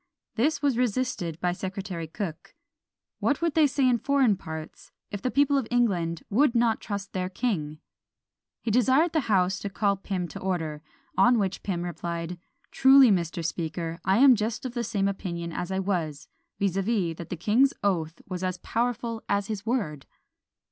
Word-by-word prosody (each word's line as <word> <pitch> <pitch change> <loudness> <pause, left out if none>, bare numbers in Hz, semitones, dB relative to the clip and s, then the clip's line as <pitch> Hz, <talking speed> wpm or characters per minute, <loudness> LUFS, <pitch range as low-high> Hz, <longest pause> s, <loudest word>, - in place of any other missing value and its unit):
This 290 +5 0
was 270 -4 +2
resisted 235 -9 -1
by 180 0 +1
Secretary 185 -2 -5
Cooke; 165 -1 -6 0.6
"What 285 - +1
would 335 -2 0
they 310 -1 +5
say 270 -1 +1
in 245 -2 +3
foreign 270 -6 +3
parts, 160 -3 -9 0.2
if 205 - -5
the 255 - 0
people 280 +1 +3
of 245 - -4
England 180 -9 +1
would 250 +4 +3
not 230 -1 +2
trust 200 -1 -5
their 185 -1 -2
king?" 175 -9 -2 0.9
He 225 - -1
desired 260 +8 +3
the 320 - +3
house 190 -1 +2
to 200 - -4
call 200 0 +1
Pym 185 -2 -3
to - - -8
order; 165 -5 -2 0.4
on 245 0 +6
which 195 -3 -1
Pym 175 -3 -2
replied, 170 0 -4 0.3
"Truly, 265 -2 +7
Mr. 170 -3 -1
Speaker, 165 0 -3
I 190 +2 +3
am 265 +1 +8
just 220 +3 -3
of 250 - -4
the 240 -1 -2
same 205 -4 0
opinion 170 -4 -4
I 190 +3 -3
was; 175 -7 -2 0.3
viz., 195 -3 0
that 185 -5 -1
the 180 - -4
king's 230 - +3
oath 165 -5 -1
was 185 -1 -5
as 185 -1 -1
powerful 230 +2 -2
as 200 0 0
his 215 0 -4
word." 190 - -2
200 Hz, 170 wpm, -27 LUFS, 175-240 Hz, 0.9 s, am